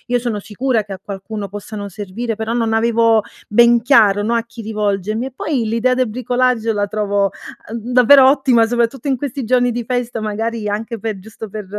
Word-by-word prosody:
io - - +3
sono 235 -3 -3
sicura 220 +3 -1
che 200 - -7
a 190 - -8
qualcuno 200 +1 -6
possano 205 +1 -7
servire, 210 +4 -5
però, 225 +1 -3
non 230 -2 0
avevo 230 0 +3 0.3
ben 235 +2 +5
chiaro, 220 -6 +4
no, 225 +3 0
a 230 - 0
chi 230 0 -11
rivolgermi 210 +1 -2
e 265 - -6
poi 270 -7 -1
l'idea 230 +3 +1
del 255 0 +1
bricolage 245 0 0
la 205 -1 -1
trovo, 205 -1 0 0.4
uhm, 230 +1 -5
davvero 260 +2 +7
ottima, 265 -4 +3
soprattutto 240 +4 -1
in 265 - +1
questi 275 +1 -4
giorni 245 +1 +2
di 240 +1 -3
festa, 245 -2 -2
magari, 215 0 -3
anche 225 +3 -4
pe 215 -1 -4
giusto 220 +2 -10
per 210 0 -7
225 Hz, 195 wpm, -18 LUFS, 210-245 Hz, 0.4 s, davvero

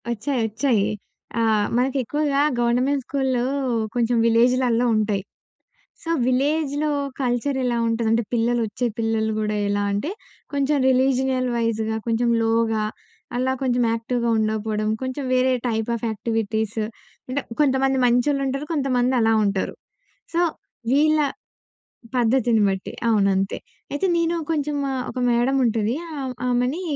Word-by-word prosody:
ఒచ్చాయి. 235 +3 -1
ఒచ్చాయి. 225 -1 +1 0.5
ఆహ్, 220 -2 +2
మనకి 260 +2 +1
ఎక్కువగా 290 +3 0 0.2
గవర్నమెంట్ 250 +4 +1
స్కూల్‌లో 265 -3 0 0.5
కొంచెం 240 0 +1
విలేజ్‌లల్లో 240 +1 +3
ఉంటాయి. 210 -2 0 0.8
సో 330 - -5 0.2
విలేజ్‌లో 290 +3 +1 0.3
కల్చర్ 255 +2 0
ఎలా 245 -1 0
ఉంటదంటే, 225 0 +1
పిల్లలొచ్చే 235 0 0
పిల్లలు 225 -1 0
గూడా 215 0 -1
ఎలా 205 0 0
అంటే 205 - -2 0.4
కొంచెం 285 +1 +1
రిలీజినల్ 260 0 +2
వైజ్‌గా 220 -1 0
కొంచెం 235 +1 +1
లోగా 225 -1 +1 0.5
అలా 255 +1 +1
కొంచెం 250 -2 +2
యాక్టివ్‌గా 235 +1 -1
ఉండకపోవడం, 215 0 -1
కొంచెం 260 +2 -3
వేరే 255 +1 +3 0.2
టైప్ 225 -1 -1
ఆఫ్ 235 - -4
యాక్టివిటీస్, 220 0 -2 0.5
అంటే 260 +3 -1 0.2
కొంతమంది 270 -1 +3
మంచోళ్ళుంటారు, 275 +3 +1
కొంతమందలా 250 -5 +2
ఉంటారు. 200 -2 -1 0.6
సో, 340 - +3 0.5
వీళ్ళ 310 +2 +4 1.0
పద్ధతిని 240 -2 +3
బట్టి. 190 -1 -3 0.2
అవును. 210 -3 +3
అంతే. 195 +1 -1 0.4
అయితే 290 +7 0
నేను 335 0 +1
కొంచెం 295 -2 -1 0.3
ఒక - - -6
మేడముంటది 235 -2 +2 0.2
ఆహ్, 265 -2 -3 0.2
ఆమెనీ, 250 +7 0
245 Hz, 115 wpm, -23 LUFS, 225-265 Hz, 1.0 s, వీళ్ళ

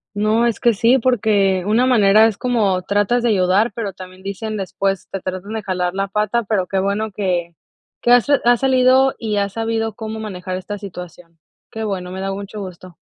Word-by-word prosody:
No, 215 +3 +2
es 235 -2 0
que 235 -1 +3
sí, 230 +5 +3
porque 205 -6 +2
una 225 +5 +2
manera 215 -3 +5
es 215 -3 -3
como 215 -7 +1
tratas 205 +6 +1
de 240 - +2
ayudar, 195 +2 +2
pero 210 -4 -4
también 185 0 -12
dicen 215 +2 -4
después: 195 0 -2
"Te 195 - -5
tratan 185 +3 -5
de 220 -1 -4
jalar 180 -2 -2
la 195 0 -2
pata", 210 +3 0
pero 200 -3 -1
qué 195 - -1
bueno 200 +3 -1
que 175 -4 -2 0.5
que 240 - +2
has 245 -1 +5
ha 245 -4 +4
salido, 260 +1 +4
y 215 -3 -2
has 200 -1 -1
sabido 225 0 -2
cómo 220 +1 -6
manejar 185 -3 -5
esta 205 +2 -6
situación. 175 -4 -10 0.3
Qué 220 0 -4
bueno, 185 -3 -4
me 190 - -6
da 195 0 -3
mucho 200 +2 -7
gusto. 185 -2 -9
205 Hz, 195 wpm, -19 LUFS, 190-225 Hz, 0.5 s, manera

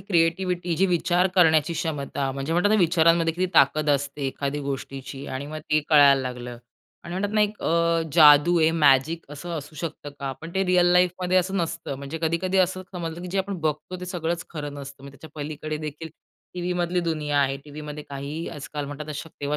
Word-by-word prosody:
Creativity 175 0 +1
जी 195 +3 +3
विचार 175 +1 +2
करण्याची 160 -3 +4
क्षमता. 140 -4 -2
म्हणजे 140 +4 -3
म्हणतात 180 +4 +2
ना, - - +5
विचारांमध्ये 165 -1 +3
किती 185 +1 0
ताकद 145 +2 +4
असते 140 0 -1
एखादी 140 +2 -3
गोष्टीची 135 0 -6
आणि 130 +2 -5
मग 155 +1 -6
ते 155 0 +4
कळायला 140 -3 +6
लागलं 125 -2 -6 0.5
आणि 170 - -6
म्हणतात 205 +3 -2
ना, 215 - +3
एक 210 0 0
अ, 170 0 +2
जादू 155 +1 +7
आहे 160 0 +4
मॅजिक 155 +1 +3
असं 145 +4 -8
असू 150 +1 -10
शकतं 150 -2 -6
का? 135 -1 -3
पण 165 - -8
ते 190 0 +1
रिअल 180 -1 +4
लाईफमध्ये 180 0 +2
असं 185 +2 +1
नसतं. 165 -4 -3
म्हणजे 140 +4 -6
कधी-कधी 170 +4 0
असं 185 0 +1
समजलं, 170 -2 -5
की 180 - -6
जे 190 +2 -2
आपण 195 0 -2
बघतो 155 +4 -3
ते 180 - -6
सगळंच 170 -2 -3
खरं 145 -3 -6
नसतं. 140 -1 -10
मग 140 - -9
त्याच्या 140 +3 -14
पलीकडे 155 0 -5
देखील, 155 +1 -6 0.5
टीव्हीमधली 180 0 -1
दुनिया 155 -4 -1
आहे. 135 -1 +1
टीव्हीमध्ये 150 0 -8
काहीही 140 +4 -5
आजकाल 145 0 -6
म्हणतात 145 +1 -6
तेव्हा 150 - -4
शक्य 160 -2 -9
व्हा 150 +1 0
160 Hz, 195 wpm, -24 LUFS, 145-175 Hz, 0.5 s, जादू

